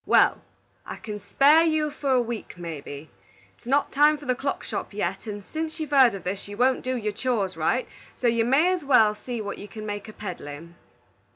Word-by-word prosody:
"Wal, -, -, +4 dB, 0.4 s
I -, -, -7 dB
can 210 Hz, -2 st, -7 dB
spare 280 Hz, -, +5 dB
you 310 Hz, -2 st, +1 dB
for 285 Hz, -1 st, -4 dB
a 255 Hz, -, +4 dB
week, 230 Hz, -5 st, -6 dB
mebby. 155 Hz, -3 st, -7 dB, 0.5 s
It's -, -, -20 dB
not 280 Hz, +3 st, +2 dB
time 295 Hz, +1 st, +5 dB
for 290 Hz, -, -12 dB
the 255 Hz, -, +2 dB
clock 275 Hz, +2 st, -3 dB
shop -, -, -5 dB
yet, 195 Hz, +1 st, -3 dB
and 205 Hz, -1 st, -5 dB
sence 320 Hz, +1 st, -3 dB
you've 310 Hz, -2 st, -4 dB
heerd 260 Hz, -6 st, +6 dB
o' -, -, -3 dB
this, 190 Hz, +2 st, -5 dB
you 205 Hz, 0 st, -8 dB
won't 255 Hz, +2 st, +3 dB
do 255 Hz, 0 st, -2 dB
your 210 Hz, -3 st, -2 dB
chores 205 Hz, -5 st, -1 dB
right, -, -, 0 dB, 0.3 s
so -, -, -5 dB
you 230 Hz, -1 st, +3 dB
may 290 Hz, +10 st, +4 dB
as 360 Hz, -4 st, -3 dB
wal 225 Hz, -6 st, +5 dB
see 235 Hz, +2 st, -5 dB
what 205 Hz, -1 st, -5 dB
you 205 Hz, -, -8 dB
can 215 Hz, +1 st, -8 dB
make 205 Hz, 0 st, -5 dB
of 215 Hz, -, -12 dB
peddlin'." 170 Hz, -4 st, -7 dB
235 Hz, 215 wpm, -25 LUFS, 205-280 Hz, 0.5 s, heerd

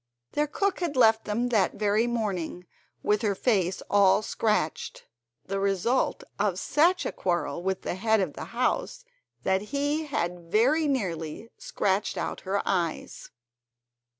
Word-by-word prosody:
Their 300 Hz, 0 st, 0 dB
cook 395 Hz, +6 st, -1 dB
had 335 Hz, -6 st, -2 dB
left 225 Hz, -2 st, +5 dB
them 230 Hz, +4 st, -1 dB
that 210 Hz, -6 st, +2 dB
very 210 Hz, +2 st, +2 dB
morning, 195 Hz, -7 st, -2 dB, 0.4 s
with 210 Hz, 0 st, +2 dB
her 205 Hz, -3 st, +1 dB
face 190 Hz, -5 st, +1 dB
all 200 Hz, +1 st, +4 dB
scratched, 210 Hz, -9 st, -1 dB, 0.4 s
the 195 Hz, 0 st, -2 dB
result 200 Hz, +6 st, +1 dB, 0.2 s
of 200 Hz, -3 st, +1 dB
such 335 Hz, -, +2 dB
a -, -, -1 dB
quarrel 175 Hz, -3 st, -1 dB
with 190 Hz, +1 st, -2 dB
the -, -, -2 dB
head 220 Hz, +4 st, +2 dB
of 190 Hz, -, -1 dB
the -, -, -7 dB
house -, -, -1 dB, 0.4 s
that 190 Hz, 0 st, +2 dB
he 290 Hz, +7 st, -1 dB
had 175 Hz, -10 st, -3 dB
very 275 Hz, +9 st, +3 dB
nearly 190 Hz, -, -3 dB
scratched 210 Hz, -, -1 dB
out -, -, -3 dB
her 200 Hz, +1 st, +1 dB
eyes. 175 Hz, -4 st, -2 dB
210 Hz, 145 wpm, -27 LUFS, 190-255 Hz, 0.4 s, left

